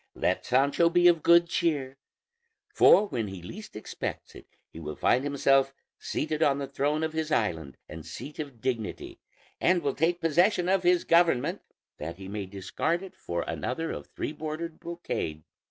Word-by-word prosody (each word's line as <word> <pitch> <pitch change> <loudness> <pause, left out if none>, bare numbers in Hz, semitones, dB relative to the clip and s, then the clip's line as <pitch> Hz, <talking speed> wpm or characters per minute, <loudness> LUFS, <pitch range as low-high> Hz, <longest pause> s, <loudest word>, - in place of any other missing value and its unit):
Let - - 0
Sancho 140 +6 +3
be 175 +1 +5
of 170 -2 +5
good 170 +2 +6
cheer; 145 -6 -1 0.8
for 210 - +6
when 115 -4 -2
he 95 -3 -8
least 210 - -10
expects 105 - -6
it - - -13 0.3
he - - -9
will 75 -2 -6
find 125 +2 +2
himself 135 -1 +2 0.2
seated 155 0 -3
on 140 -3 +3
the 140 - -3
throne 145 +3 -1
of 160 0 -2
his 160 -1 -2
island 80 - -1
and 80 +1 -9
seat 135 - -9
of 140 -7 -7
dignity, 120 -5 -3 0.4
and 175 -2 +2
will 140 -2 0
take 170 +3 +1
possession 175 +3 +2
of 190 0 +3
his 180 -1 +3
government 170 -7 +3 0.4
that 80 +2 -5
he 95 -1 -9
may 100 -1 -5
discard 100 - -2
it 190 -1 -10
for 85 0 -3
another 160 +6 -3
of - - -7
three - - -4
bordered 155 +2 -5
brocade. 80 - -4
145 Hz, 170 wpm, -28 LUFS, 110-170 Hz, 0.8 s, good